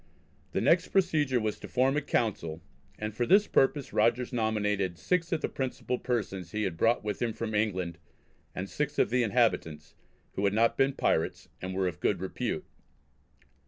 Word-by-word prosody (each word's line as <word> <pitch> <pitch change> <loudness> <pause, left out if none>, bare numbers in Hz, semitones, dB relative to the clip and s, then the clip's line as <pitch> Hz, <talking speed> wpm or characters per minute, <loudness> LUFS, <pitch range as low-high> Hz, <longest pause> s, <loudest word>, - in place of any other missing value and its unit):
The - - 0
next - - +4
procedure 155 -9 +2
was 110 -1 -2
to - - -8
form 130 +2 +2
a 150 - +1
Council, 90 - -1 0.4
and 105 0 -4
for 120 +2 -1
this 200 +4 +6
purpose 135 -3 +1
Rogers 120 +2 +2
nominated 105 -5 0
six 170 - 0
of 160 - 0
the - - 0
principal 125 -1 -3
persons 95 -8 -3
he 105 0 -1
had 95 -5 -2
brought 115 +8 +2
with 105 -2 -3
him 115 -2 0
from 110 0 -4
England, 95 -6 -1 0.6
and - - -3
six - - -3
of - - +2
the 125 0 +3
inhabitants 80 - 0 0.4
"who 100 - -3
had 100 +1 +2
not 115 +1 +3
been 135 +1 +2
pirates, 80 - 0
and 95 0 -4
were 95 -1 +1
of 90 - -4
good - - +1
repute." - - -3
110 Hz, 180 wpm, -29 LUFS, 95-125 Hz, 0.6 s, this